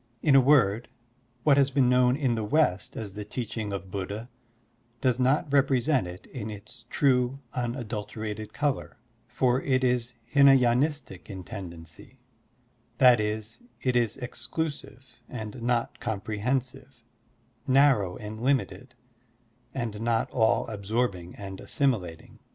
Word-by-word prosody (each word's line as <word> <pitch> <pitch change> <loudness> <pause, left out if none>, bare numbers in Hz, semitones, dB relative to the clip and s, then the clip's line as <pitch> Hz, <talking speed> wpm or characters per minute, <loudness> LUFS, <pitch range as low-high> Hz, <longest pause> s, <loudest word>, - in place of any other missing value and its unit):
In 145 - +4
a 135 - +8
word, 125 -5 +3 0.5
what 145 -2 +5
has 140 -1 +4
been 135 -2 +3
known 125 0 +4
in 135 -5 +1
the 110 -1 -2
West 105 - +1
as 105 -3 -5
the 105 +1 -6
teaching 110 -1 -4
of 95 -1 -6
Buddha 100 +5 -5 0.7
does 125 -1 +1
not 135 +2 +1
represent 135 - +3
it 90 +3 -10
in 110 -5 -7
its 105 +2 -10
true, 130 -2 +2 0.2
imadulterated 110 -3 -4
color, 145 -2 -2 0.3
for 130 0 +1
it 130 -1 +1
is 125 -1 0 0.2
Htna 140 -1 +7
y^nistic 125 - 0
in 95 -2 -7
tendency; 85 -5 -10 0.8
that 125 -3 +7
is, 110 +1 -3 0.2
it 125 -1 +1
is 120 -3 +1
exclusive 135 0 -5
and 110 -1 -7
not 120 0 -1
comprehensive, 120 +4 -3 0.6
narrow 130 -9 +4
and 110 +1 -8
limited, 130 -1 -1 0.8
and 115 -5 -4
not 115 -1 0
all 110 -3 +2
absorbing 100 -4 -2
and 95 -1 -8
assimilating. 100 - -2
120 Hz, 130 wpm, -27 LUFS, 105-130 Hz, 0.8 s, a